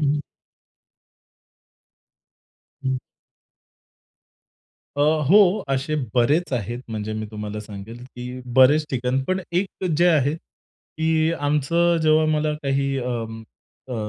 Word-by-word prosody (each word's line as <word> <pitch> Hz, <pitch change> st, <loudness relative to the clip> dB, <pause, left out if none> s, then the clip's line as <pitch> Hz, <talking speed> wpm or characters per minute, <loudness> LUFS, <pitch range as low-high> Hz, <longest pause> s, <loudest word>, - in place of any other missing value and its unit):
हं. 145 Hz, 0 st, +1 dB, 2.6 s
हं. 130 Hz, 0 st, 0 dB, 2.0 s
अ, -, -, -1 dB, 0.3 s
हो. 200 Hz, +1 st, +5 dB
असे 135 Hz, +3 st, -1 dB, 0.2 s
बरेच 145 Hz, +7 st, +2 dB
आहेत 120 Hz, 0 st, -2 dB
म्हणजे 110 Hz, 0 st, -4 dB
मी 110 Hz, 0 st, -4 dB
तुम्हाला 105 Hz, 0 st, -5 dB
सांगेल, 105 Hz, +3 st, -9 dB
की 125 Hz, 0 st, -8 dB, 0.2 s
बरेच 145 Hz, +4 st, +6 dB
ठिकाण, 130 Hz, +1 st, 0 dB
पण 185 Hz, +3 st, -1 dB
एक 185 Hz, +1 st, -2 dB
जे 175 Hz, +2 st, +4 dB
आहे 150 Hz, -3 st, +3 dB
की 160 Hz, 0 st, -3 dB
आमचं 160 Hz, +4 st, +1 dB
जेव्हा 155 Hz, 0 st, +4 dB
मला 150 Hz, 0 st, 0 dB
काही 135 Hz, 0 st, 0 dB
अं, 115 Hz, -3 st, -4 dB, 0.5 s
अ, 125 Hz, -, -4 dB
135 Hz, 105 wpm, -23 LUFS, 120-155 Hz, 2.6 s, बरेच